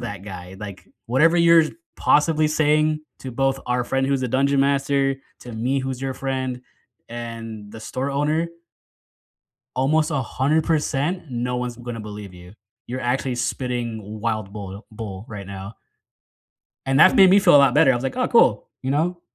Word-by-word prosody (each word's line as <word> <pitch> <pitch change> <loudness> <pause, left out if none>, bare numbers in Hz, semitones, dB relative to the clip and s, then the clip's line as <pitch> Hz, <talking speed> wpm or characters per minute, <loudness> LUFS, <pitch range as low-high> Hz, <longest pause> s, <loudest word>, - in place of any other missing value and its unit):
that 105 -6 -6
guy, 95 -2 -9
like, 100 -3 -9 0.2
"Whatever 155 +8 +4
you're 170 -1 +6 0.3
possibly 155 0 +3
saying 155 0 +2 0.2
to 130 - -6
both 135 +2 0
our 125 0 0
friend 135 +1 0
who's 135 -1 0
a 125 - -1
dungeon 135 +3 +2
master, 140 0 +1 0.2
to 120 - -9
me 125 +5 -1
who's 130 -1 -4
your 135 -1 -2
friend, 130 -2 -3 0.5
and 115 -3 -7
the 115 - -9
store 130 +5 -3
owner" 155 +4 0 1.3
"almost 150 +4 +2
100%, 150 +4 0
no 125 0 -2
one's 125 -1 -3
gonna 120 -1 -6
believe 105 -3 -8
you. 90 +1 -13 0.3
You're 130 +2 -4
actually 125 +1 -1
spitting 115 -3 -3
wild 110 -4 -2
boil 100 0 -8
bull 105 -2 -7
right 100 -3 -7
now." 100 +2 -8 1.1
And 135 +2 +2
that 185 - +7
made 190 -1 +8
me 200 - +7
feel 180 -5 +6
a - - +10
lot 140 -3 +5
better, 150 -2 +5
I - - +1
was 120 - -3
like, 135 - -2
"Oh, 255 - +1
cool. 125 - +3
You 130 - -1
know? 170 +4 0
130 Hz, 170 wpm, -22 LUFS, 115-145 Hz, 1.3 s, a